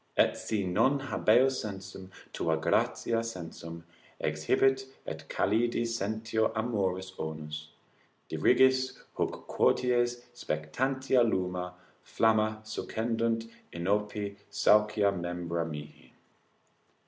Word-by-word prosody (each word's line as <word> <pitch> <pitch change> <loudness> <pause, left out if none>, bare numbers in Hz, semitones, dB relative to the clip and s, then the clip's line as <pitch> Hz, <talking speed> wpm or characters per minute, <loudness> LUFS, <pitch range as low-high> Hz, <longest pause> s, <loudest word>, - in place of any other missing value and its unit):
Et - - +3
si 110 - -1 0.2
non 130 +6 +4
habeo 120 +2 +4
sensum, 95 -5 -6 0.2
tua 80 -1 0
gratia 115 +7 +1
sensum 85 -5 -7 0.4
Exhibet, 130 +13 +2 0.2
et - - -7
calidi 115 +3 +1
sentio 110 0 -1
amoris 95 -5 -1
onus. 75 -1 -5 0.6
Dirigis 130 +10 +3 0.2
huc - - -2
quoties 120 -1 +2
spectantia 130 - 0
lumina, 90 -4 -1 0.3
flamma 110 -1 +1
Succendunt 115 +1 -1 0.2
inopi 100 +3 -1
saucia 105 -1 +4
membra 85 -2 -3
mihi. 75 -1 -9
105 Hz, 90 wpm, -30 LUFS, 90-115 Hz, 0.6 s, non